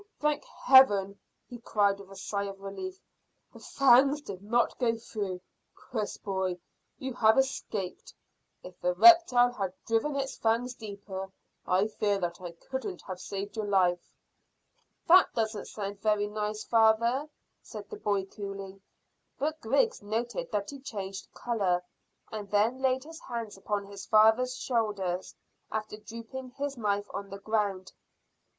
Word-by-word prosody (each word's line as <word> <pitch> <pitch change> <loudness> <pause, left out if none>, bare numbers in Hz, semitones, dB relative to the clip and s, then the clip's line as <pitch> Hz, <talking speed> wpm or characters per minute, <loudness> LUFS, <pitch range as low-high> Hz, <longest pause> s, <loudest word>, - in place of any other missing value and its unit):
Thank 300 -1 +1
Heaven!" 205 -7 +5 0.3
he 240 - -9
cried, 200 -3 +1
with 195 -1 -12
a 195 - -11
sigh 200 +1 -3
of 195 -1 -7
relief. 370 - -6 0.5
"The - - -12
fangs 275 +2 +4
did 195 -9 -8
not 235 +4 +1
go 230 -2 +1
through. 200 -5 -5 0.3
Chris, 220 -5 -4
boy, 190 -2 -2 0.4
you 265 -1 -5
have 220 -1 +4
escaped. 220 -8 -2 0.5
If 180 -1 -12
the 180 0 +1
reptile 250 - +7
had 195 -6 -4
driven 230 +6 +1
its 275 -1 -2
fangs 230 +3 +1
deeper, 200 -4 -7 0.4
I 185 +3 +3
fear 210 -1 0
that 175 -1 -3
I 175 -2 -7
couldn't 265 - -6
have 185 -1 -7
saved 195 +1 -5
your 215 -2 -2
life." 180 -3 +1 0.9
"That 365 +2 +7
doesn't 220 -2 -1
sound 200 -1 -5
very 210 -1 +2
nice, 210 0 -3
father," 230 +5 +3 0.3
said - - -9
the 425 - -6
boy 200 - 0
coolly; 195 -1 -8 0.6
but 310 +2 -2
Griggs 280 - +1
noted 225 +3 -3
that 205 +1 -2
he 280 - -9
changed 195 -7 -6
colour, 195 -7 0 0.5
and 210 -2 -6
then 220 +6 +2
laid 260 0 +2
his 320 +1 -10
hands 230 -3 -5
upon 200 +1 -3
his 200 0 -10
father's 220 +4 +4
shoulders, 205 -8 -1 0.4
after 215 -1 -3
dropping 230 +4 -8
his 280 0 -2
knife 205 -3 0
on 200 0 -5
the 195 - -7
ground. 200 -3 -1
215 Hz, 145 wpm, -29 LUFS, 195-245 Hz, 0.9 s, reptile